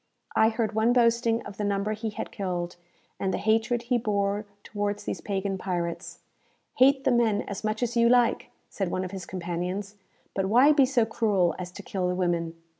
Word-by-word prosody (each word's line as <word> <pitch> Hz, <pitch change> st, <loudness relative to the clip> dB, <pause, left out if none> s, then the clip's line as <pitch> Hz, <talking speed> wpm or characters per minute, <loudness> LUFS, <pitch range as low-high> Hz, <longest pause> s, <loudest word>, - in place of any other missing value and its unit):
I 220 Hz, -, +5 dB
heard 225 Hz, -1 st, -1 dB
one 220 Hz, +3 st, +3 dB
boasting 235 Hz, -1 st, +2 dB
of 200 Hz, -, -10 dB
the 210 Hz, -, -2 dB
number 200 Hz, +1 st, 0 dB
he 220 Hz, +1 st, -4 dB
had 210 Hz, -, -6 dB
killed, 180 Hz, -3 st, -3 dB, 0.4 s
and 190 Hz, -, 0 dB
the -, -, -1 dB
hatred 225 Hz, +2 st, +1 dB
he 240 Hz, 0 st, +1 dB
bore 205 Hz, -1 st, -1 dB, 0.2 s
towards 205 Hz, 0 st, -3 dB
these -, -, -4 dB
pagan 195 Hz, -1 st, -2 dB
pirates. 175 Hz, -3 st, -4 dB, 0.6 s
"Hate 270 Hz, +1 st, +5 dB
the -, -, +3 dB
men 230 Hz, -4 st, +2 dB
as 200 Hz, +1 st, -6 dB
much 215 Hz, +2 st, -1 dB
as 240 Hz, 0 st, -2 dB
you 235 Hz, 0 st, +4 dB
like," 245 Hz, -1 st, +3 dB, 0.2 s
said 195 Hz, -3 st, -3 dB
one 185 Hz, +1 st, -2 dB
of 185 Hz, -, -7 dB
his 190 Hz, -3 st, -7 dB
companions, 180 Hz, +3 st, -4 dB, 0.4 s
"but 195 Hz, -1 st, -1 dB
why 250 Hz, +8 st, +6 dB
be 280 Hz, -3 st, +5 dB
so 250 Hz, -4 st, +2 dB
cruel 205 Hz, -6 st, +1 dB
as 180 Hz, -1 st, -6 dB
to -, -, -9 dB
kill 185 Hz, -2 st, -2 dB
the 180 Hz, -, -1 dB
women? 170 Hz, -2 st, -1 dB
205 Hz, 195 wpm, -27 LUFS, 190-230 Hz, 0.6 s, why